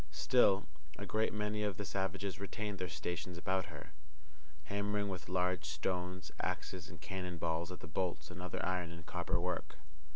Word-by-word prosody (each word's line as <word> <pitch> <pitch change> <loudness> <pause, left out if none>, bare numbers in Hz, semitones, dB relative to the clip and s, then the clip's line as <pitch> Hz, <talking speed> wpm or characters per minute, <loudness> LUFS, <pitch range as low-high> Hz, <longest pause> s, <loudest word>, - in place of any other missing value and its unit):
Still 95 +6 +5 0.3
a 105 - -3
great 110 +2 +2
many 105 0 0
of 105 -2 +1
the 100 - -2
savages 95 0 -1
retained 100 +1 -2
their 90 -1 -1
stations 85 +3 -2
about 95 +1 +2
her, 85 0 -8 0.7
hammering 100 +3 +1
with 95 -3 -4
large 90 -2 +2
stones, 90 +4 -1
axes, 90 -3 -2
and 85 - -9
cannon 90 -1 -3
balls 85 +1 0
at 90 - -6
the - - -6
bolts 90 +3 -1
and 90 0 -6
other 90 - -1
iron 90 -2 +1
and 85 -1 -8
copper - - +1
work. 90 0 -1
90 Hz, 170 wpm, -37 LUFS, 85-100 Hz, 0.7 s, Still